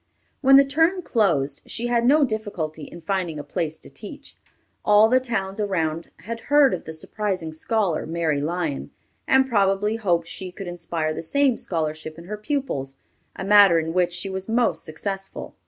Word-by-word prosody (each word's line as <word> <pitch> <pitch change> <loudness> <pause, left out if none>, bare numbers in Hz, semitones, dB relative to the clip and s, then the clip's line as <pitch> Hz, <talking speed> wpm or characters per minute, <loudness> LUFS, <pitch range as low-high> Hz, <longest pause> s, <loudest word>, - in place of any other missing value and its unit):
When 270 -1 +7
the 275 0 +8
term 325 +6 +2
closed, 155 - +1
she 235 - -3
had 240 0 +2
no 295 +3 +5
difficulty 185 - -4
in 170 - -11
finding 175 -2 -2
a 145 - -5
place 160 0 -3
to - - -14
teach. - - -8 0.5
All 210 +1 +6
the 255 +3 +4
towns 215 -5 -3
around 165 -5 -1
had 230 +3 -5
heard 290 -2 +5
of - - -4
the 160 - -6
surprising 180 0 -3
scholar, 185 0 -1
Mary 160 -3 0
Lyon, 160 -2 -2 0.4
and 265 0 +4
probably 205 -1 +1
hoped 175 -6 +1
she 180 +2 -7
could 195 +2 -8
inspire 170 -3 -3
the - - -5
same 270 - +2
scholarship 155 -3 -4
in 170 - -10
her 210 +4 -6
pupils, 210 - -3 0.4
a - - -5
matter 200 -3 +7
in 160 0 -1
which 180 -1 +2
she 180 +2 -4
was 190 +1 -5
most 225 -8 +1
successful. 195 +5 -5
190 Hz, 175 wpm, -23 LUFS, 160-225 Hz, 0.5 s, the